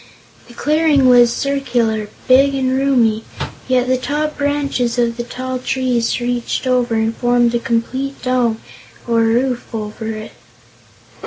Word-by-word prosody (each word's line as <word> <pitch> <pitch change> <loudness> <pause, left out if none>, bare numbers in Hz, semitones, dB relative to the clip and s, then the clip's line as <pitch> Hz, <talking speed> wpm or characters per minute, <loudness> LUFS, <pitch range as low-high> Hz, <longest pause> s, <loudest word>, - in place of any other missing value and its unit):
The 240 - -15
clearing 300 -2 +2
was 245 -1 +6
circular, 240 -6 -1 0.2
big 275 +2 +5
and 260 -1 0
roomy, 245 -5 +2 0.4
yet 255 -1 +2
the 255 0 +1
top 300 +3 -2
branches 280 -4 -1
of 235 -1 +1
the 240 - -4
tall 255 +1 -5
trees 255 -2 0
reached 245 +1 -2
over 250 -2 +1
and 220 0 0
formed 240 -1 +2
a 240 - +1
complete 260 +4 -2
dome 245 -3 +1 0.5
or 230 -1 +2
roof 240 +2 +1
for 215 -2 -5
it. 215 -1 -6
245 Hz, 140 wpm, -17 LUFS, 235-265 Hz, 0.5 s, was